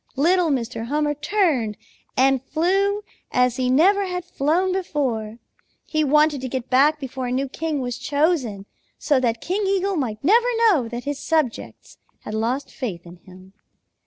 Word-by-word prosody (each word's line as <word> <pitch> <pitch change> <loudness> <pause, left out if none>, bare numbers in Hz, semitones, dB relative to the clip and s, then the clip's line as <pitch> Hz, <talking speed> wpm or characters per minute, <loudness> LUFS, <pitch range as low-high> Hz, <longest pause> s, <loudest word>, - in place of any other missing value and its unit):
Little 340 +4 +3
Mr. 235 -4 -2
Hummer 295 +2 0
turned 295 - 0 0.4
and 265 0 +3
flew 390 +8 0 0.3
as 250 -1 +2
he 255 -1 0
never 385 +9 +4
had 360 -1 -4
flown 355 +4 0
before. 255 - -2 0.5
He 310 -1 0
wanted 300 -1 +3
to 260 - -4
get 260 0 -5
back 290 +4 +4
before 260 -2 -5
a - - -3
new 265 +2 0
king 305 +1 -3
was 245 -1 -4
chosen, 285 - 0 0.3
so 285 -4 +2
that 235 -2 -1
King 390 +4 -1
Eagle 390 -1 0
might 225 -7 -3
never 460 - +4
know 405 - +3
that 240 +1 -6
his 285 0 -4
subjects 310 -8 -2 0.2
had 215 - -7
lost 235 +6 -2
faith 185 -10 -5
in 175 +1 -12
him. 185 +1 -16
280 Hz, 160 wpm, -22 LUFS, 245-335 Hz, 0.5 s, never